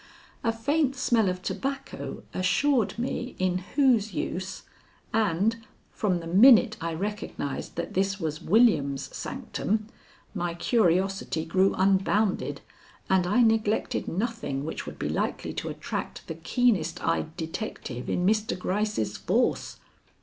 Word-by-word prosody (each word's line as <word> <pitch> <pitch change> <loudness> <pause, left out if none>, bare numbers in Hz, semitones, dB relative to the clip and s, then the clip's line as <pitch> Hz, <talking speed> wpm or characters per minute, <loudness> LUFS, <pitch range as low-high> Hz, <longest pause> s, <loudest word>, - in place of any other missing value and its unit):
A 230 - +2
faint 275 +5 +1
smell 235 -6 +2
of 180 0 -4
tobacco 275 +4 -4
assured 195 +7 +2
me 245 +1 -3
in 185 -1 +1 0.2
whose 240 - +3
use, 185 +1 -3 0.5
and 215 +1 +2 0.3
from 185 -5 0
the - - -8
minute 215 +5 +7
I 165 0 -2
recognized 195 -7 -4
that - - -4
this 195 +1 0
was 155 -3 -3
William's 155 - +2
sanctum, 215 +1 -2 0.5
my 175 -1 -2
curiosity 190 -4 +1
grew 190 +4 +2
unbounded 195 +2 +1 0.5
and 185 -2 +3
I 240 +6 +4
neglected 220 -1 +1
nothing 195 - -2
which 160 - -5
would - - -7
be - - -2
likely - - -2
to - - -4
attract - - -5
the - - -5
keenest 195 -10 +1
eyed 160 0 -1
detective 160 - -5
in 180 - 0
Mr. 215 +2 +1
Gryce's 200 - -1
force. - - 0
195 Hz, 130 wpm, -27 LUFS, 175-225 Hz, 0.5 s, minute